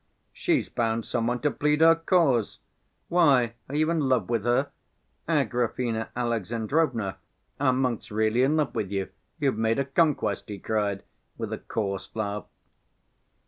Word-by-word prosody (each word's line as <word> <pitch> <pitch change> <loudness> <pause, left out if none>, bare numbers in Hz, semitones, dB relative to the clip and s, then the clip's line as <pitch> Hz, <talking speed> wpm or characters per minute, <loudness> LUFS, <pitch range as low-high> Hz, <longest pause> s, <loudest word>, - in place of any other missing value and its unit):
"She's 340 -4 0
found 115 -1 -1
some 115 -2 -1
one 125 0 -1
to 150 - +2
plead 150 +1 +1
her 165 0 +8
cause! 165 - +2 0.5
Why, 135 -9 +4 0.2
are 140 - -4
you 155 +2 +2
in 165 - +1
love 130 -8 +1
with 115 -2 0
her? 125 +4 +2 0.6
Agrafena 120 -2 0
Alexandrovna, 115 - -1 0.4
our 130 -2 +3
monk's 125 -3 -1
really 110 +3 +1
in 140 +4 +3
love 150 -6 0
with 100 - -2
you, 95 -1 -2 0.3
you've 135 -7 0
made 115 +1 +2
a 140 - +1
conquest!" 140 - +1
he 105 - -5
cried, 100 -1 -1 0.3
with - - -4
a - - -4
coarse 100 -3 -3
laugh. 105 -2 -3
120 Hz, 150 wpm, -26 LUFS, 110-145 Hz, 0.6 s, her